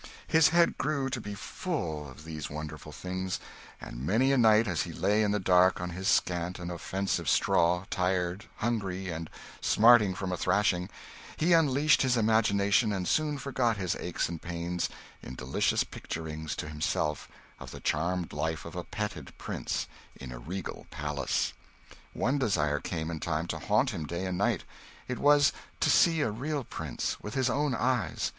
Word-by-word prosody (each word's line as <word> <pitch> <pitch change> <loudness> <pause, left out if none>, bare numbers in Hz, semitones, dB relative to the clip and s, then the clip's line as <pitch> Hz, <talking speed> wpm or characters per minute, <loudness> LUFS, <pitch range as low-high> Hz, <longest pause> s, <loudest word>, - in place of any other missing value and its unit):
His 160 -1 +5
head 170 0 +3
grew 140 -2 0
to 125 -3 -2
be 105 -1 -6
full 85 - -4
of 65 +4 -12
these 80 -2 -5
wonderful 75 0 -7
things, 95 +3 -4 0.4
and - - -8
many 115 - +3
a 135 - +3
night 110 -1 +5
as 85 -4 0
he - - -4
lay 105 +2 +2
in 105 - +2
the 105 0 +1
dark 90 0 +4
on 90 0 -4
his 95 +3 -4
scant 90 -3 +1
and 90 -1 -5
offensive 95 +3 -2
straw, 90 +2 +3
tired, 90 +1 0
hungry, 95 -5 -2
and 80 -1 -5 0.3
smarting 110 -4 +6
from 95 -1 -3
a 90 - -1
thrashing, 95 -2 +1 0.5
he 170 +3 +3
unleashed 150 -2 +4
his 125 -2 +2
imagination 105 -1 +3
and 95 -3 -2
soon 150 -1 +1
forgot 125 -5 0
his 90 -3 -1
aches 90 - -2
and 85 -1 -6
pains 85 0 -2 0.3
in 65 - -8
delicious 65 +2 +1
picturings 80 -1 -5
to - - -5
himself 75 -1 -2 0.3
of - - -8
the - - -9
charmed 85 +3 -1
life 80 -1 -2
of - - -8
a - - -3
petted - - -5
prince - - -3 0.3
in 65 -2 -9
a - - -7
regal 90 +8 -6
palace. 75 -2 -1 0.6
One 135 +4 0
desire 75 - +1
came 80 +2 -3
in 80 - -4
time 80 0 -1
to - - -3
haunt 110 +6 +2
him 80 -8 -4
day 85 +4 -3
and 95 -1 -2
night: - - +1 0.4
it 125 - -3
was 145 0 +5 0.3
to - - +3
see 165 -2 +5
a 115 - +1
real 140 +6 -3
prince, 75 - -4
with 105 - -6
his 130 -2 +2
own 145 -2 +1
eyes. 125 -1 0
95 Hz, 175 wpm, -29 LUFS, 85-120 Hz, 0.6 s, smarting